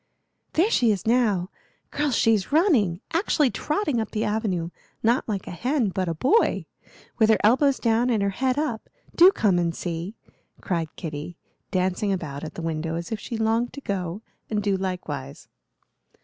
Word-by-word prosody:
"There 375 +8 +3
she 235 - +4
is 200 -3 -2
now! 220 -6 +2 0.4
Girls, 295 -4 0
she's 220 -2 +2
running! 255 - +3
actually 320 - +2
trotting 300 - -1
up 220 - -4
the 215 -1 -2
avenue 195 -6 -1 0.3
not 235 +1 +2
like 200 -3 -2
a - - -7
hen, 245 - 0
but 185 -1 -2
a 165 - -2
boy 385 - +2 0.5
with 220 -1 +5
her 220 - +6
elbows 265 +5 +4
down 230 +1 +2
and 220 -4 +1
her 200 - +1
head 260 +5 0
up. 290 -7 -2 0.2
Do 360 +3 +8
come 205 - +2
and 170 -1 0
see!" 175 +4 -4 0.4
cried 165 -4 -3
Kitty, 155 +1 -6 0.3
dancing 185 +2 0
about 155 -6 -4
at 155 - -7
the 170 - -6
window 160 0 -2
as 170 +4 -5
if 220 - -2
she 230 - -5
longed 225 +2 0
to 280 - -8
go 190 -3 -3 0.3
and 210 -1 -1
do 200 -1 +1
likewise. 155 -8 -5
210 Hz, 175 wpm, -25 LUFS, 175-245 Hz, 0.5 s, Do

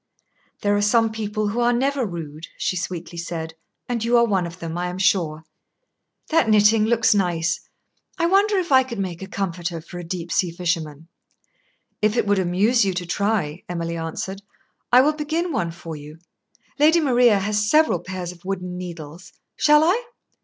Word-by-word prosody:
"There 205 0 +2
are 205 - +1
some 225 +2 +3
people 215 -1 -2
who 225 +4 -2
are 240 0 +3
never 265 0 0
rude," 160 -3 -7
she - - -1
sweetly 175 -1 -5
said, 165 -1 -5 0.3
"and 235 -2 -2
you 240 +1 +3
are 235 - +5
one 190 -6 0
of 170 +1 -10
them, 165 -2 -6
I 175 +1 -2
am 180 +1 -5
sure. 165 -5 +1 0.9
That 320 -8 +3
knitting 215 0 +5
looks 230 0 +3
nice. 170 -4 0 0.6
I 335 - +1
wonder 395 +3 +3
if 355 -4 -2
I 260 -1 +7
could 255 -3 -6
make 185 -3 -4
a 190 - -6
comforter 175 -3 -3
for 175 +2 -9
a - - -6
deep 170 0 -5
sea 180 - +1
fisherman." 165 -3 -3 0.9
"If 215 +2 +2
it - - +2
would 205 -1 +2
amuse 195 +7 +2
you 190 -2 0
to 180 -1 -3
try," 185 -4 -1
Emily 170 -1 -3
answered, 170 +4 -5 0.5
"I 250 +1 +8
will 300 +3 +3
begin 315 +3 -2
one 175 - -1
for 165 -1 -8
you. 150 +1 -11 0.6
Lady 315 +3 +5
Maria 245 -7 +4
has 210 +1 0
several 310 +5 +4
pairs 185 -2 -6
of 175 -1 -16
wooden 180 -1 -4
needles. 170 -1 -9 0.2
Shall 300 0 +5
I?" 380 +9 +2
195 Hz, 180 wpm, -22 LUFS, 170-235 Hz, 0.9 s, I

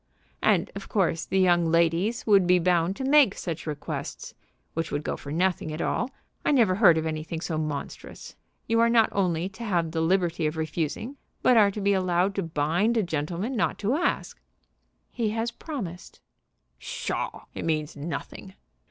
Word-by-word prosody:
"And - - +2
of - - -8
course 170 -6 +1
the 190 - -1
young 175 -2 +4
ladies 170 +7 +1
would 200 -4 +5
be 180 0 +5
bound 175 +1 +2
to 265 - -5
make 275 -6 +5
such 165 -2 -5
requests, 150 -2 -5 0.4
which 165 0 -3
would 145 +1 -2
go - - -2
for 140 - -9
nothing 175 -1 0
at 155 - -5
all. 235 +7 -1 0.3
I - - +1
never 230 -9 +4
heard 185 -5 +6
of 160 - -1
anything 160 +1 -3
so 160 -1 -3
monstrous. 150 -2 -6 0.3
You 230 0 +1
are 230 0 +5
not 230 -2 +4
only 180 -3 0
to 200 +4 -10
have 175 -7 0
the 160 -1 -1
liberty 170 -2 +1
of 155 +1 -4
refusing, 160 - -3 0.3
but 250 - +5
are 210 -3 +6
to 205 +1 -5
be 200 0 +3
allowed 185 0 +1
to 195 - -1
bind 165 +8 0
a 220 - +3
gentleman 170 - -3
not 215 - 0
to 215 +4 0
ask!" 345 +5 -1 0.7
"He 230 -3 -1
has 230 +1 -1
promised." 225 - -7 0.6
"Pshaw! - - -4
It - - -5
means 155 -1 -1
nothing." 170 +5 -6
180 Hz, 180 wpm, -26 LUFS, 160-210 Hz, 0.7 s, heard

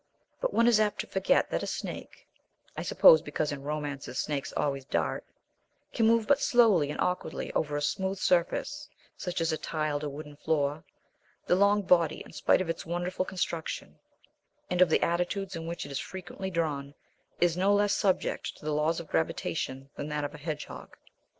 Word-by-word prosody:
But - - 0
one 230 - +3
is 235 -3 +5
apt 210 -1 +1
to - - -8
forget 190 0 +2
that - - 0
a - - -3
snake - - -6 0.5
(I - - -3
suppose - - +7
because 150 -1 -2
in 140 -1 -5
romances 145 -3 -4
snakes 145 -2 -2
always 140 -2 0
"dart") 135 - -1 0.7
can 225 -2 +3
move 230 -1 +4
but 285 +2 +3
slowly 215 - +4
and 150 - -5
awkwardly 180 0 -2
over 150 -2 0
a 145 - -2
smooth 190 +4 -1
surface, 180 -2 0 0.3
such 180 -1 -4
as 165 0 +1
a 155 - -2
tiled 155 -2 -2
or 150 - -2
wooden 145 +1 -9
floor. 145 -1 0 0.6
The - - +2
long 200 +2 +4
body, 170 -4 +3
in - - -14
spite 150 +4 +3
of 185 - -2
its 165 0 -3
wonderful 175 +2 -2
construction, 170 -4 -4 0.7
and 180 0 +2
of 180 - +7
the - - +3
attitudes 180 +3 -1
in 165 0 -5
which 170 -3 -4
it 140 - -9
is 140 - -2
frequently 190 +1 -6
drawn, 145 -5 -2 0.4
is 175 -1 +3
no 190 +3 +3
less 205 0 +3
subject 195 -2 0
to - - -14
the 155 - 0
laws 155 +3 +1
of 170 - -8
gravitation 140 -4 -2
than 145 - -4
that 150 -1 -2
of 145 +1 -4
a 150 - -10
hedgehog. 150 0 -6
165 Hz, 190 wpm, -29 LUFS, 150-190 Hz, 0.7 s, suppose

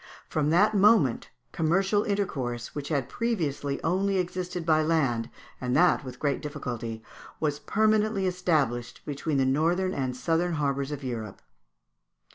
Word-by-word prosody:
From 150 -1 0
that 205 +7 +4
moment 200 - +4 0.2
commercial 190 +6 +2
intercourse, 130 - -2
which 145 -1 -5
had 140 -5 0
previously 150 - -2
only 190 +3 +1
existed 180 -1 -3
by 155 -1 +4
land, 135 -8 +1 0.3
and 125 0 -1
that 175 -1 +4
with 125 -2 -8
great 140 0 -1
difficulty, 120 -7 -5 0.4
was 150 -2 -1
permanently 215 -1 +2
established 145 -10 0
between 145 +1 -2
the 135 - +3
northern 170 +7 +1
and 130 -2 -2
southern 165 +6 0
harbours 140 -2 -1
of 145 -1 -5
Europe. 115 -6 -5
155 Hz, 135 wpm, -27 LUFS, 130-185 Hz, 0.4 s, that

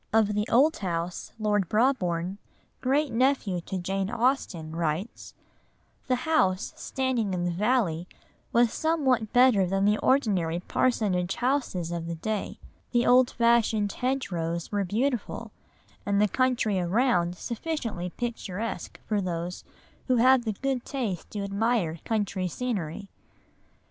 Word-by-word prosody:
Of 215 -1 +3
the 210 +1 0
old 295 +7 +4
house, 175 -2 -3
Lord 205 -4 0
Brabourne, 195 -6 +1 0.4
great 275 0 +1
nephew 230 -7 +1
to 190 - -5
Jane 190 +2 -2
Austen, 225 - -1
writes: 170 +5 -3 0.7
"The 255 - +3
house 190 -13 +1
standing 245 -7 -1
in 175 -1 -1
the 175 - 0
valley 185 -4 +1 0.4
was 235 -1 +3
somewhat 265 -9 +1
better 245 -7 +5
than 195 +2 +1
the 210 +1 +3
ordinary 190 - +2
parsonage 190 -4 0
houses 245 - -1
of 170 -1 -4
the 170 - -3
day; 210 +5 -3 0.3
the 240 -1 +2
old 250 0 +6
fashioned 230 -3 +2
hedgerows 175 -11 -2
were 205 -1 0
beautiful, 235 +5 -2 0.5
and 200 0 +1
the 210 - +4
country 240 -4 +1
around 180 -2 +1
sufficiently 230 - -4
picturesque 225 -1 -5
for 210 -2 0
those 175 -1 -4 0.4
who 255 - +3
have 250 +1 +5
the 220 - 0
good 265 +3 -2
taste 225 - -4
to 205 -2 -4
admire 200 -4 0
country 200 -4 -1
scenery." 200 -4 -3
210 Hz, 130 wpm, -27 LUFS, 180-250 Hz, 0.7 s, old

